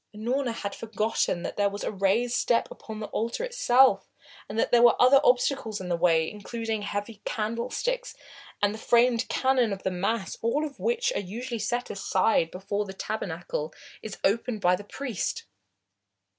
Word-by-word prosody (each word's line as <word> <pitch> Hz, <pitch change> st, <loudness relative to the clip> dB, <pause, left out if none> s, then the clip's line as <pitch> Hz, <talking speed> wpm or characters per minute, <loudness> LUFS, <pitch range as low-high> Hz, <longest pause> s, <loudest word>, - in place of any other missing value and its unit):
Unorna 245 Hz, +4 st, -1 dB
had 200 Hz, -3 st, -4 dB
forgotten 215 Hz, -5 st, -1 dB
that -, -, -5 dB
there 205 Hz, -1 st, +3 dB
was 200 Hz, +1 st, -6 dB
a -, -, -1 dB
raised 205 Hz, +5 st, +1 dB
step 235 Hz, -1 st, +1 dB
upon 220 Hz, -1 st, -8 dB
the 215 Hz, -, -4 dB
altar 235 Hz, -, -2 dB
itself, 270 Hz, -, +3 dB, 0.4 s
and 210 Hz, -, -5 dB
that -, -, +1 dB
there 240 Hz, -, +6 dB
were 240 Hz, -1 st, +6 dB
other 265 Hz, +2 st, +7 dB
obstacles 245 Hz, -3 st, +2 dB
in 185 Hz, -1 st, -6 dB
the 175 Hz, -, +2 dB
way, 165 Hz, -2 st, +3 dB
including 220 Hz, +2 st, -4 dB
heavy 205 Hz, +1 st, -4 dB
candlesticks 245 Hz, -, -2 dB, 0.5 s
and 205 Hz, 0 st, +3 dB
the 220 Hz, -, -8 dB
framed 240 Hz, +1 st, +3 dB
Canon 260 Hz, -4 st, +2 dB
of 195 Hz, -1 st, -5 dB
the 190 Hz, -, 0 dB
Mass, 195 Hz, +3 st, -2 dB
all 275 Hz, +7 st, +1 dB
of 285 Hz, -2 st, -9 dB
which 480 Hz, +1 st, 0 dB
are -, -, -1 dB
usually 235 Hz, +5 st, -5 dB
set 245 Hz, +3 st, -2 dB
aside 190 Hz, -3 st, +1 dB
before 200 Hz, +3 st, -3 dB
the 190 Hz, -, -8 dB
tabernacle 170 Hz, -6 st, -4 dB, 0.3 s
is 215 Hz, -2 st, -7 dB
opened 220 Hz, +2 st, +1 dB
by 180 Hz, -2 st, +4 dB
the 195 Hz, -, -9 dB
priest. 265 Hz, -, -4 dB
220 Hz, 170 wpm, -27 LUFS, 200-245 Hz, 0.5 s, other